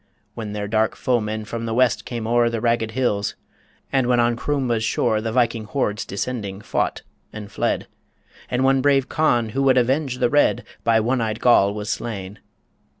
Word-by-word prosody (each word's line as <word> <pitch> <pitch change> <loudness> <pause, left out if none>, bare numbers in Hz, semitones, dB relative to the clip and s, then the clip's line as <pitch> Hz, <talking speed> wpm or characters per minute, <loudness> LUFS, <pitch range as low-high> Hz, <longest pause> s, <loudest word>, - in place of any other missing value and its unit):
When 110 -2 -6
their 105 -1 -3
dark 110 +1 +1
foemen 110 -3 -1
from 115 +1 -5
the 115 - -2
west 125 0 +2
came 120 -3 -5
o'er 120 +1 +3
The 115 -1 -2
ragged 115 -1 +1
hills, 110 -4 -1 0.6
and 130 -2 +2
when 125 -1 +3
on 120 0 +2
Croumba's 125 -3 -1
shore 110 -1 +1
The 110 0 -3
Viking 115 -2 +1
hordes 105 -3 -2
descending, 100 -2 -4
fought - - -2 0.3
and 105 -2 -9
fled - - -1 0.6
And 125 +1 0
when 135 0 +3
brave 135 -1 +3
Conn, 120 -8 +1
who 135 +5 -2
would 135 -1 +4
avenge 130 +2 +1
the 120 - +1
Red, 145 0 +3 0.2
By 115 -1 +3
one 125 +3 0
eyed 110 -1 -2
Goll 100 -5 +4
was 105 0 -3
slain. 100 -4 -5
115 Hz, 180 wpm, -22 LUFS, 110-125 Hz, 0.6 s, would